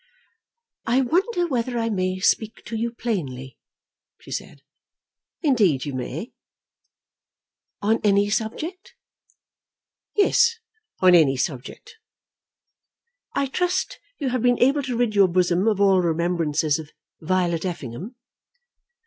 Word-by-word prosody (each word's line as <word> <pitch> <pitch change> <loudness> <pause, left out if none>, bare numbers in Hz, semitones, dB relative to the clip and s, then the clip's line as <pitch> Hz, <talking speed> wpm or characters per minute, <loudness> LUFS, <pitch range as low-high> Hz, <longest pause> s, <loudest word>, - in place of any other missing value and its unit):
"I 250 +3 +3
wonder 350 - +1
whether 245 -5 -2
I 230 -1 -1
may 185 -2 -1
speak 220 +3 0
to 225 - -5
you 230 +1 -1
plainly," 135 - -4 0.6
she - - -14
said. 140 - -6 0.8
"Indeed 205 - +3
you 145 - -4
may." 135 - -5 1.5
"On 220 +2 +2
any 200 -1 +3
subject?" 310 - -4 1.2
"Yes; 465 +3 +4 0.5
on 185 -1 +6
any 150 -6 +5
subject." 145 - -5 1.4
"I 280 - +1
trust 365 - -1 0.2
you 275 -4 -2
have 250 -1 -1
been 245 0 +3
able 275 +4 +3
to 255 -3 -3
rid 240 -3 +1
your 200 -2 +5
bosom 180 +2 +1
of 210 -3 +2
all 195 -2 +4
remembrances 165 -3 0
of 155 -2 -9 0.3
Violet 170 -1 0
Effingham." 175 - -6
205 Hz, 115 wpm, -23 LUFS, 170-250 Hz, 1.5 s, on